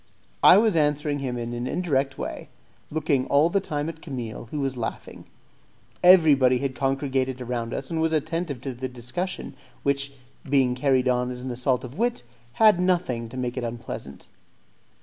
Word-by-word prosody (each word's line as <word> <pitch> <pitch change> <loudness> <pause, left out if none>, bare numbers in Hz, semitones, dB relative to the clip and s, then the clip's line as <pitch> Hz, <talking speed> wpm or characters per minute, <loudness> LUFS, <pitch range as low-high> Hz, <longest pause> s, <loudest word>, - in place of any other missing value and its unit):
I 185 - +9
was 215 -3 +3
answering 150 -1 +1
him 130 -3 -3
in 120 0 -4
an 120 +1 -3
indirect 140 -6 0
way, - - -6 0.4
looking 145 -4 0
all 150 +4 +4
the 200 - +3
time 150 -5 -3
at 165 -1 -7
Camille, 120 -7 -6
who 150 - -4
was 135 -2 -1
laughing. 120 -2 -6 0.8
Everybody 150 -8 +6
had 135 +1 -2
congregated 135 -1 -1
around 120 -2 -3
us 135 - -4
and 160 -1 0
was 160 0 +1
attentive 160 -3 -2
to 135 0 -4
the 130 +2 -5
discussion, 125 +12 -4 0.3
which, 140 0 0 0.4
being 130 -3 +3
carried 130 0 +2
on 125 0 +1
as 125 0 -6
an 130 - -4
assault 125 +1 0
of 130 - -9
wit, 240 - 0 0.3
had 215 - +5
nothing 170 -11 0
to 130 - -9
make 125 0 -3
it 125 - -2
unpleasant. 115 - -6
135 Hz, 170 wpm, -25 LUFS, 125-155 Hz, 0.8 s, I